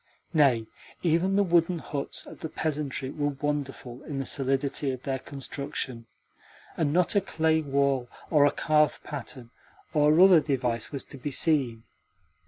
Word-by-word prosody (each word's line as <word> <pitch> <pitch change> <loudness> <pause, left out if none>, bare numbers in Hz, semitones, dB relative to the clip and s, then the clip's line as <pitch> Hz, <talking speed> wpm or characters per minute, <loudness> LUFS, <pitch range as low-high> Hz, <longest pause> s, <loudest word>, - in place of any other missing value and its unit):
Nay, 135 -8 +4 0.4
even 175 +3 +2
the 200 - +4
wooden 170 -1 +2
huts 145 -3 -4
of - - -12
the 160 - -5
peasantry 145 -4 -3
were 145 -2 -2
wonderful 135 -4 -3
in 145 -4 -5
the 135 - -2
solidity 135 +2 0
of 130 -1 -4
their 135 -1 -2
construction, 135 -3 -5 0.7
and 150 -3 0
not 180 +5 +2
a 200 - +5
clay 160 -3 +1
wall 140 -3 0 0.2
or 145 -3 +6
a - - +2
carved 150 0 +2
pattern 130 -4 -7 0.4
or 150 +1 +4
other 185 -2 +8
device 125 -6 -2
was 140 -3 -4
to 140 - -12
be 145 - -3
seen. 130 -6 +1
145 Hz, 155 wpm, -27 LUFS, 135-155 Hz, 0.7 s, other